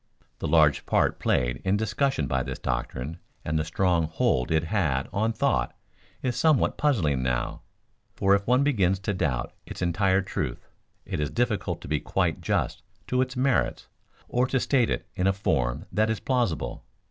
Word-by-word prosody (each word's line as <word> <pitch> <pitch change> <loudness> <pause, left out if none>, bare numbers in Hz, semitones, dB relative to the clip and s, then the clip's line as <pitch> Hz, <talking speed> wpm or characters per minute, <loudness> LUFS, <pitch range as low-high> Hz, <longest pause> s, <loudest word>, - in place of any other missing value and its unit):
The - - -2
large 75 -2 +4
part - - +2
played 60 0 0
in 95 +2 +2
discussion 110 - 0
by 65 0 0
this - - -4
doctrine 75 +8 -3 0.3
and 80 +1 0
the - - +1
strong 85 0 +1
hold 65 -5 +1
it 80 0 +2
had 80 -7 0
on 110 +3 +1
thought 65 - 0 0.5
is 125 -2 0
somewhat 155 +2 +3
puzzling 85 - +1
now; 60 -1 -1 0.5
for 95 0 +3
if 100 0 +1
one 125 +3 +4
begins 100 -10 +2
to 100 +2 -2
doubt 95 - -1
its - - -8
entire 95 +2 +2
truth 70 -9 -4 0.4
it - - -3
is 75 - 0
difficult 120 -5 -1
to - - -9
be 75 - 0
quite - - -1
just - - -1 0.2
to 125 0 +1
its 130 0 -2
merits 130 0 +1 0.4
or 125 +1 +1
to 130 - +1
state 125 -2 +2
it - - -2
in 95 -1 +1
a 95 - +4
form 75 -6 -1
that 110 +1 +2
is 110 - -1
plausible. 100 - -1
95 Hz, 175 wpm, -26 LUFS, 75-115 Hz, 0.5 s, large